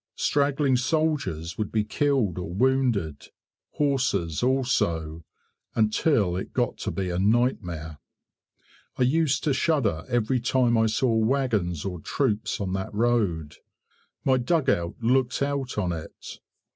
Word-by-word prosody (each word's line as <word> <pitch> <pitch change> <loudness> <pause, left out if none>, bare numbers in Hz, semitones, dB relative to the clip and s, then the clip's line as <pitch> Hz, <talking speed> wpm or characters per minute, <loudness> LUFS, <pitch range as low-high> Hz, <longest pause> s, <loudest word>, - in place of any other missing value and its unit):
Straggling 140 -2 +1
soldiers 130 - -1
would 105 - -2
be 110 -1 +1
killed 115 - 0
or 90 -2 -5
wounded, 115 - 0 0.5
horses 125 - 0
also, 85 -12 0 0.5
until 110 - +2
it 95 - -5
got - - 0
to - - -3
be 95 -2 -3
a 90 - -1
nightmare. 90 - 0 1.0
I - - +2
used 145 +1 +2
to 150 - +2
shudder 130 - +1
every 120 +1 +1
time 120 -1 +2
I 110 0 +3
saw 115 +2 +1
wagons 110 - 0
or 90 -3 -4
troops 110 - -1
on 95 -3 -2
that 95 0 -3
road. 105 -10 0 0.7
My 130 -1 +4
dugout 125 - 0
looked 125 +2 +1
out 140 -3 -2
on 90 -4 0
it. 80 -1 -8
115 Hz, 130 wpm, -25 LUFS, 90-130 Hz, 1.0 s, My